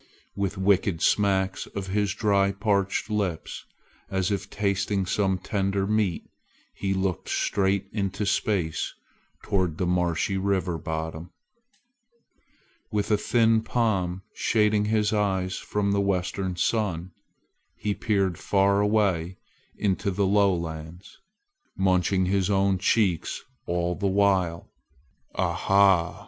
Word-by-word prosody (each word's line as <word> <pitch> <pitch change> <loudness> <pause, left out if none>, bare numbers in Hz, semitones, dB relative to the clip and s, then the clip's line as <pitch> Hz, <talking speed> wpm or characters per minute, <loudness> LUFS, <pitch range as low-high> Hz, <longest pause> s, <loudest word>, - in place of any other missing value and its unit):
With 100 0 -2
wicked 95 -2 +2
smacks 95 -2 +1
of 100 -2 -5
his 100 0 0
dry 100 -2 +2
parched 100 -1 0
lips, 95 -6 -3 0.4
as 95 0 0
if 100 -1 -3
tasting 100 -1 0
some 95 0 +1
tender 95 +1 -1
meat, 105 -4 0 0.5
he 95 0 -3
looked 95 -2 -1
straight 100 0 0
into 100 -1 -2
space 95 -5 -1 0.5
toward 90 -5 0
the 90 - 0
marshy 90 +1 0
river 95 -3 0
bottom. 80 +2 -5 1.6
With 105 +1 -1
a - - +6
thin 115 +1 +3
palm 95 -6 -1
shading 105 -1 +2
his 105 0 +1
eyes 95 -3 0
from 100 -1 -1
the 100 0 +2
western 95 -1 -1
sun, 90 -3 -1 0.6
he 105 0 -2
peered 100 -5 0
far 100 0 +2
away 100 -4 +1 0.4
into 100 0 0
the 100 +1 0
lowlands, 90 -3 -1 0.6
munching 95 0 +2
his 95 +1 +1
own 95 -1 +2
cheeks 95 -4 +1 0.2
all 85 0 0
the 100 +3 -2
while. 95 -4 +1 0.7
"Ah - - 0
ha!" 95 -3 +3
95 Hz, 115 wpm, -26 LUFS, 90-100 Hz, 1.6 s, a